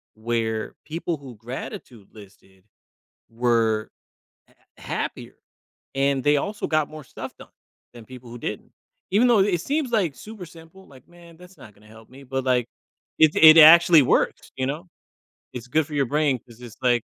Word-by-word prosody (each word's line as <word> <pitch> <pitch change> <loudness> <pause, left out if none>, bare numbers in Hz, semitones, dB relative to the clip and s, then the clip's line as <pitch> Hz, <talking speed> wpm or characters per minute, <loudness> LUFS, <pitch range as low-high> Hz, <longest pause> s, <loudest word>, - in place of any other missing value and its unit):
where 110 -1 -3
people 165 +1 -4
who 135 -4 -12
gratitude 115 -2 -9
listed 95 -2 -18 0.7
were, 115 -2 0 0.6
uh, - - -26 0.3
happier - - -6 0.6
and 135 -1 0
they 145 0 +4
also 205 +7 -4
got 155 -2 0
more 155 -2 -11
stuff - - -9
done - - -16 0.4
than 120 -2 -12
people 125 -2 -13
who 120 - -9
didn't. - - -7 0.4
Even 220 +6 +3
though 235 -4 +4
it 190 -3 +1
seems 285 -3 -2
like 185 - 0
super 210 - -10
simple, 165 +4 -16
like, 130 -2 -18
"Man, 170 -1 -17
that's 180 +1 -17
not 105 - -15
gonna 105 +1 -22
help 110 0 -17
me," 135 +2 -14
but, 135 0 -4
like, 125 -2 +1 0.5
it 155 -1 +5
it 160 0 +8
actually 170 +1 +8
works, - - 0
you 130 - -2
know? 155 +6 -5 0.7
It's 125 0 -7
good 155 +3 0
for 150 - -9
your 140 -3 +1
brain 145 -1 0
'cause 120 0 -19
it's 120 -3 -12
like 120 -2 +2
135 Hz, 170 wpm, -23 LUFS, 120-165 Hz, 0.7 s, it